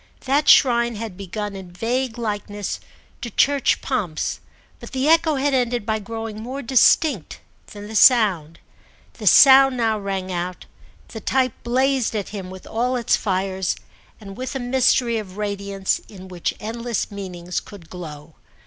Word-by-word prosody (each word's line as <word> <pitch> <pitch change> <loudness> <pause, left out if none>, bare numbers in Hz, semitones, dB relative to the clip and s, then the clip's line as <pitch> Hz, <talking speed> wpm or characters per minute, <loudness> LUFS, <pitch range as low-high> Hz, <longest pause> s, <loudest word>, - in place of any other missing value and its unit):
That 280 +3 +1
shrine 235 -3 +5
had 215 -3 -6
begun 200 +2 -5
in 190 -2 -9
vague 240 +6 -2
likeness 205 -3 -4 0.4
to 240 - -4
church 280 +4 +2
pomps, 200 - -2 0.4
but - - -11
the 265 +2 0
echo 325 -1 +4
had 280 +1 0
ended 245 -4 0
by 220 -1 -1
growing 225 0 -6
more 260 +4 -6
distinct 260 - +3 0.3
than 205 0 -10
the 220 - -9
sound. 190 - +4 0.6
The - - -4
sound 270 -1 +7
now 225 -2 +1
rang 195 -2 -4
out, 180 0 -4 0.4
the 220 - -8
type 255 -1 +1
blazed 260 0 +1
at 205 -2 -3
him 195 -3 -7
with 185 0 -11
all 245 +3 -1
its 240 -2 +2
fires 190 -1 -1 0.4
and 195 -3 -10
with 255 +4 -5
a - - -1
mystery 245 -2 +2
of 195 -2 -9
radiance 200 -2 -2
in 190 -3 -11
which 180 -2 -3
endless 230 0 -3
meanings 180 -3 -5
could 195 -6 -13
glow. 155 -3 -9
220 Hz, 155 wpm, -22 LUFS, 195-250 Hz, 0.6 s, sound